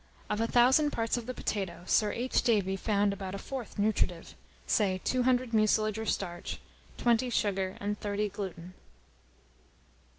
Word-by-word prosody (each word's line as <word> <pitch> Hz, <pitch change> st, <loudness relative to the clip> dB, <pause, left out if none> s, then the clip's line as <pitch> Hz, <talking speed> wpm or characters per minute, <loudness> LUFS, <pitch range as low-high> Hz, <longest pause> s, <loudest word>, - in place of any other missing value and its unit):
Of 210 Hz, +1 st, 0 dB
a 230 Hz, -, +1 dB
thousand 260 Hz, +6 st, +5 dB
parts 230 Hz, -4 st, -1 dB
of 240 Hz, -1 st, -5 dB
the 255 Hz, -, -3 dB
potato, 190 Hz, -4 st, -3 dB
Sir 210 Hz, +2 st, +3 dB
H. 250 Hz, +2 st, 0 dB
Davy 200 Hz, -5 st, +2 dB
found 200 Hz, 0 st, +1 dB
about 195 Hz, -1 st, -5 dB
a -, -, -3 dB
fourth 255 Hz, +2 st, -7 dB
nutritive; 200 Hz, -5 st, 0 dB, 0.3 s
say, 190 Hz, -3 st, +1 dB
200 255 Hz, -1 st, +1 dB
mucilage 215 Hz, 0 st, +2 dB
or 220 Hz, -, -4 dB
starch, 175 Hz, -4 st, -3 dB, 0.4 s
20 240 Hz, +1 st, +2 dB
sugar, 195 Hz, -5 st, 0 dB
and 205 Hz, +1 st, -3 dB
30 205 Hz, 0 st, -1 dB
gluten. 185 Hz, -3 st, -7 dB
210 Hz, 145 wpm, -30 LUFS, 195-235 Hz, 0.4 s, thousand